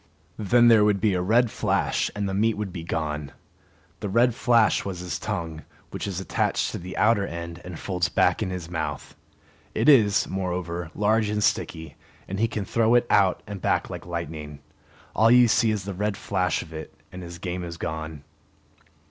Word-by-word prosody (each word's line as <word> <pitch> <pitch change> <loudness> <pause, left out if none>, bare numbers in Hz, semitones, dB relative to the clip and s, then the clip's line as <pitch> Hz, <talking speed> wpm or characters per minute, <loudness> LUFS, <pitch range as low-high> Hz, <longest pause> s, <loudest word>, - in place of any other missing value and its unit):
Then 120 +3 +4
there 115 -3 +7
would 105 -1 +2
be 105 0 +2
a 90 - 0
red 115 +5 +3
flash - - 0
and 100 -1 -2
the 95 - -3
meat 110 +3 +2
would 105 -3 -5
be 85 - -6
gone. 75 -3 -3 0.7
The 105 - -4
red 120 +4 +3
flash 115 -2 +3
was 95 -2 -5
his 90 -1 -4
tongue, 80 -2 -4 0.3
which - - -4
is 95 -3 -3
attached 95 - -1
at - - -5
the 90 +2 -7
outer 105 -1 +3
end 85 0 -7
and 90 -2 -8
folds 90 -2 -1
back - - +2
in - - -1
his 90 -3 -5
mouth. 80 -2 -5 0.6
It - - +1
is, 110 -9 +5
moreover, 90 -3 -3
large 105 +1 +2
and 105 0 -1
sticky, 80 -7 -1 0.3
and 95 +1 -4
he 115 - +3
can 110 -3 -4
throw 115 +3 +2
it 120 - +4
out 95 -2 +3
and 100 -2 -7
back - - 0
like - - -7
lightning. 80 -3 -5 0.6
All 110 +2 +5
you 125 0 +7
see 115 0 +3
is 105 -3 -1
the 100 +1 -5
red 105 +2 -2
flash 90 -2 -1
of 80 - -14
it, 80 0 -7 0.2
and 90 - -8
his 85 -1 -8
game 90 0 -4
is 85 -1 -7
gone. 80 -2 -5
95 Hz, 195 wpm, -25 LUFS, 85-105 Hz, 0.7 s, there